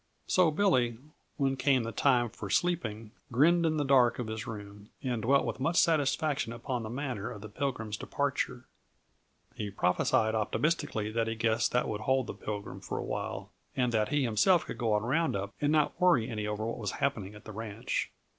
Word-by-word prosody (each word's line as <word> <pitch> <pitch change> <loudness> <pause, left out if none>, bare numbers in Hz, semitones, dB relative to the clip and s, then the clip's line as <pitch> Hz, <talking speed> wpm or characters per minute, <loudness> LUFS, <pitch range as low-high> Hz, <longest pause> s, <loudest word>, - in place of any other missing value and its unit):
So 180 -3 +4
Billy, 150 - +2 0.4
when 135 -2 +1
came 130 -1 +2
the 115 - -4
time 120 -3 +2
for 100 - -7
sleeping, 115 - 0 0.2
grinned 165 +7 +4
in 155 -1 0
the 145 - 0
dark 130 -3 +4
of 125 - -3
his 110 0 -5
room 105 -1 -8
and 125 -4 -1
dwelt 135 +5 +3
with - - -3
much 165 +6 0
satisfaction 150 -4 +2
upon 120 +1 -3
the 110 - -5
manner 125 -4 -3
of 110 -5 -8
the 110 - -8
Pilgrim's 110 -2 -3
departure. - - -2 0.9
He 105 - -4
prophesied 100 +3 +2
optimistically 110 -1 0
that 115 0 0
he 115 - -2
guessed 115 0 +1
that 125 - +2
would 105 0 -3
hold 130 +2 +2
the - - -5
Pilgrim 105 -1 -6
for - - -4
a - - -3
while, - - -4 0.2
and 125 -2 +1
that 110 -2 +1
he 145 -1 +1
himself 130 - +3
could - - -7
go 115 -3 +1
on 105 0 +1
round 155 +5 +1
up 100 +1 -3
and 145 0 +2
not 155 +2 +1
worry 170 -11 +4
any 105 -2 -3
over 105 +1 -2
what 115 - -3
was 105 -4 -3
happening 110 -8 -2
at 105 - -13
the 110 - -7
ranch. 110 +2 -3
120 Hz, 200 wpm, -30 LUFS, 110-140 Hz, 0.9 s, So